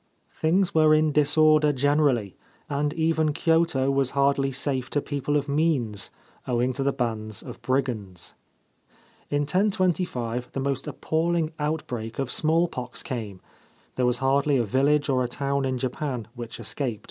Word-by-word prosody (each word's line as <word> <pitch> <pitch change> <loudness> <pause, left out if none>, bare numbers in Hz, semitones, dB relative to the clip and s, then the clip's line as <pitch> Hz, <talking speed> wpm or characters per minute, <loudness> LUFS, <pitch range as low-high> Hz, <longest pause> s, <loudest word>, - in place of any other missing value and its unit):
Things 175 +4 +1
were 155 -1 +5
in 155 0 +3
disorder 150 +1 +4
generally, 140 -6 +1 0.3
and 145 +1 -1
even 160 -2 +1
Kyoto 160 -5 +2
was 135 -2 +2
hardly 140 0 +2
safe 130 -1 -2
to 145 - 0
people 145 0 -1
of 145 - -2
means, 140 -9 0 0.4
owing 125 +1 +1
to 135 - -3
the 140 +1 +2
bands 110 -5 -3
of - - -10
brigands. 120 -9 -2 1.0
In 145 0 +1
1025 175 - 0
the - - -3
most 135 0 -2
appalling 160 +3 0
outbreak 125 -7 -3
of 135 -2 -2
smallpox 155 -6 0
came; 105 -7 -5 0.5
there 125 -1 +1
was 125 0 +1
hardly 140 +2 +2
a 120 - +2
village 140 +7 +2
or 130 -2 +2
a - - -1
town 140 +2 -1
in 130 -1 -1
Japan 125 -2 -3
which 120 -2 -8
escaped. 115 +1 -3
140 Hz, 145 wpm, -25 LUFS, 125-155 Hz, 1.0 s, were